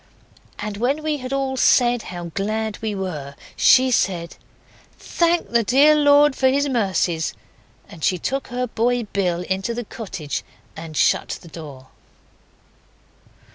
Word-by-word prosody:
And 210 -1 -5
when 270 +7 0
we 305 -1 -1
had 255 -1 -7
all 270 -1 -1
said 245 -2 +3
how 175 -2 -7
glad 215 +1 -2
we 220 -2 -2
were, 155 -8 -5 0.2
she 260 0 +5
said 175 -7 0 0.6
'Thank 340 0 0
the 235 -1 +3
dear 280 +7 +5
Lord 290 -1 +5
for 265 - +2
His 285 +2 +1
mercies,' 190 - 0 0.5
and 160 - -12
she 185 - +2
took 270 +10 -3
her 250 0 -2
boy 245 +1 0
Bill 185 -4 -1
into 190 +5 -2
the 240 -1 -4
cottage 185 -10 -6 0.3
and 160 -2 -8
shut - - +1
the 170 - -12
door. 145 -5 -11
220 Hz, 140 wpm, -21 LUFS, 180-265 Hz, 0.6 s, she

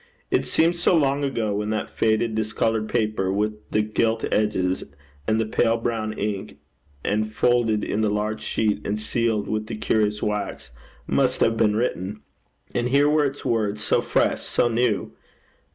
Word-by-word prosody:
It - - +1
seemed 165 +2 +2
so 175 0 +3
long 140 -1 +2
ago 115 -6 -1
when 105 +1 -2
that 110 0 -2
faded, 110 +1 +2
discoloured 110 0 0
paper, 110 -5 0
with 105 +2 -2
the 105 - +2
gilt 110 +1 0
edges, 95 -4 +1 0.4
and 110 +1 +2
the 110 - +1
pale 115 +1 +2
brown 115 -2 -2
ink, 105 -1 -4 0.5
and 110 +1 0
folded 115 -2 +2
in 110 - -1
the 110 - +2
large 105 +1 -1
sheet, 110 -2 0
and 105 +1 -2
sealed 110 -1 0
with 110 0 -2
the 115 - -4
curious 105 -1 0
wax, 105 - -3 0.3
must - - +1
have 115 - +3
been 110 -2 +2
written; 105 -3 -2 0.5
and 120 0 0
here 140 +2 +4
were 150 0 +3
its 140 +1 -4
words 105 -2 0
so - - +2
fresh, - - +1
so 120 - +1
new! 115 -2 0
110 Hz, 170 wpm, -24 LUFS, 105-115 Hz, 0.5 s, here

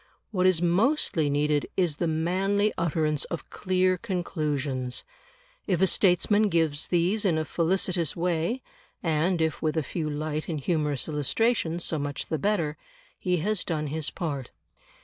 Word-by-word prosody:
What 185 -3 +3
is 175 -2 +3
mostly 175 - +2
needed 145 +1 +1
is 175 -6 +2
the 170 - 0
manly 190 +6 +1
utterance 155 -3 +1
of 170 - -6
clear 185 -1 +1
conclusions; 150 - -2 0.6
if 185 -5 +1
a 190 - +5
statesman 205 +3 +3
gives 160 -4 +1
these 180 +5 +2
in 175 -6 +2
a 155 - -1
felicitous 175 -1 0
way 175 +8 -1 0.4
(and 165 +2 +1
if 160 - -1
with 155 0 0
a 160 - +2
few 155 +1 -3
light 155 +1 -3
and 155 -3 -2
humorous 150 -2 0
illustrations, 165 - 0
so 160 - +1
much 145 -1 -4
the 160 - -1
better), 165 -5 0 0.4
he 180 -2 +1
has 215 -2 +1
done 155 -3 -2
his 155 0 -1
part. 145 -7 -4
165 Hz, 150 wpm, -27 LUFS, 150-185 Hz, 0.6 s, a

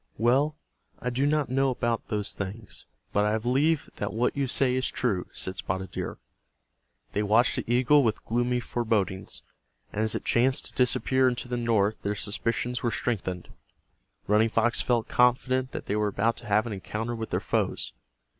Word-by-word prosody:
"Well, 135 +7 +3 0.4
I 125 - -3
do 135 +4 +1
not 150 -3 +1
know 135 +1 +2
about 120 -2 -1
those 105 -1 -1
things, 100 +3 -6 0.3
but 105 - +3
I 105 +1 +2
believe 135 +7 +1
that 105 - -2
what 115 +4 0
you 140 -1 0
say 125 +1 +3
is 130 0 +1
true," 100 -8 -1
said 95 0 -4
Spotted 95 +1 -3
Deer. - - -4 1.0
They 105 - +1
watched 110 +4 +3
the - - -3
eagle 130 +4 +5
with 110 -3 -1
gloomy 120 +1 0
forebodings, 110 -6 -2 0.5
and 105 - -1
as 110 -1 +2
it - - -4
chanced 130 +2 +2
to - - -8
disappear 130 +1 +3
into 125 0 -4
the 125 - -2
north 110 -3 +1
their 100 +1 -1
suspicions 115 +4 -2
were 120 - +1
strengthened. 95 -7 -3 0.8
Running 110 +2 +3
Fox 120 +2 +2
felt 120 -3 +1
confident 130 +1 +2
that - - -6
they 100 - -1
were 105 0 +1
about 105 +3 +1
to - - -9
have 105 +2 +3
an 115 - -4
encounter 110 +4 -4
with 115 -1 -5
their - - 0
foes. - - -1
120 Hz, 180 wpm, -27 LUFS, 105-125 Hz, 1.0 s, eagle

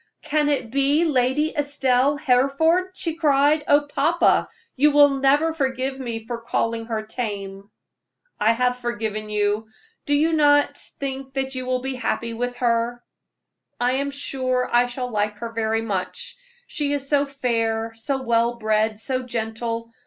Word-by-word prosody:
"Can 300 -1 +1
it 260 -6 -1
be 280 +5 +2
Lady 290 +1 +1
Estelle 285 -1 +1
Hereford?" 295 +7 +2
she 330 -3 -2
cried. 300 -1 +3
"Oh, 290 0 +4
papa, 300 +5 +2 0.3
you 295 +3 +5
will 290 0 +7
never 290 +4 +3
forgive 265 -2 -2
me 230 -3 -5
for 235 0 -4
calling 230 -1 -2
her 220 -2 -2
tame." 200 -3 -5 0.7
"I 220 +2 +4
have 250 +1 +1
forgiven 220 -3 -3
you. 210 +1 0 0.4
Do 290 - +3
you 315 +3 +2
not 290 -2 +4 0.2
think 270 -1 -5 0.2
you 255 -1 -4
will 255 0 0
be 265 +1 -3
very 255 -1 -7
happy 230 -2 -2
with 245 +2 -3
her?" 240 0 0 0.8
"I 245 +1 +2
am 280 - -2
sure 255 -2 -1
I 245 +1 +4
shall 250 0 -4
like 210 -1 -1
her 230 +2 -6
very 225 0 -1
much; 190 -4 -4 0.3
she 290 -11 -2
is 280 -1 -2
so 285 0 +2
fair, 230 -4 -1
so 260 +4 -3
well 235 0 +2
bred, 215 -1 0
so 255 +3 -2
gentle. 230 -1 -4
250 Hz, 155 wpm, -23 LUFS, 230-285 Hz, 0.8 s, will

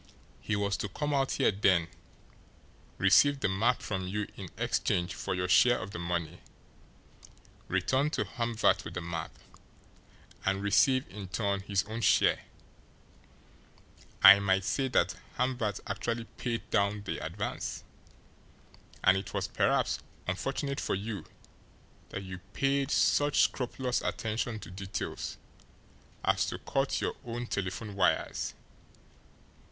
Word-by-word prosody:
He 110 - -1
was 100 -1 0
to 105 - -3
come 150 +8 -2
out 135 -1 +1
here - - +3
then, 95 -4 +3 1.1
receive 145 -1 +5
the - - +2
map 110 +6 +1
from 95 -3 -3
you 105 +2 -2
in - - -8
exchange 90 +3 0
for 100 - -3
your 90 0 -1
share 120 +6 +5
of 95 +2 -6
the 85 - -6
money, 85 -1 -3 1.3
return 130 +11 +1
to - - -1
Hamvert 115 -2 +1
with - - -8
the - - -2
map, 85 -2 -4 1.1
and 95 +1 0
receive 130 +6 +3
in 95 +1 -8
turn 100 +1 -1
his 100 0 0
own 110 +2 -5
share. 100 - +3 1.8
I 100 - +11
might 95 -1 +2
say 135 +7 0
that 130 - +2 0.2
Hamvert 120 -5 0
actually 115 0 -2
paid 120 -2 -3
down 100 +1 +1
the 95 - -4
advance - - -4 1.2
and 95 - +6
it 95 - -5
was - - -1
perhaps - - +1 0.3
unfortunate 135 +9 -2
for - - -1
you 100 +1 -5 0.8
that 95 - -5
you 95 -1 -7
paid 140 0 +1
such 145 0 +3
scrupulous 125 0 0
attention 110 +1 -2
to 85 - -9
details 95 +1 -5 0.9
as - - +2
to - - -3
cut 135 0 -1
your - - -1
own 120 0 -4
telephone 100 0 -3
wires! 90 -2 +1
105 Hz, 130 wpm, -30 LUFS, 95-125 Hz, 1.8 s, I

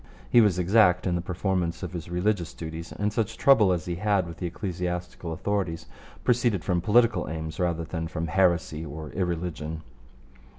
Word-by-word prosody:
He 120 - +7
was 105 -5 +3
exact 90 0 +4
in 90 - +1
the 85 - 0
performance 90 -1 -2
of 90 - -5
his 85 -1 -6
religious 90 0 -1
duties, 80 0 -7
and 105 +1 -2
such 110 -2 -1
trouble 110 -9 +5
as 85 -3 -1
he 85 -1 -3
had 100 -1 +1
with 85 -1 -8
the 90 - -3
ecclesiastical 90 -2 -4
authorities 90 -1 -2 0.4
proceeded 120 -7 +2
from 90 +1 0
political 110 -1 +3
aims 80 -1 -5
rather 85 -2 0
than 80 0 -4
from 80 0 -3
heresy 85 -2 +1
or 75 0 -7
irreligion. 80 -3 -3
90 Hz, 170 wpm, -26 LUFS, 80-100 Hz, 0.4 s, He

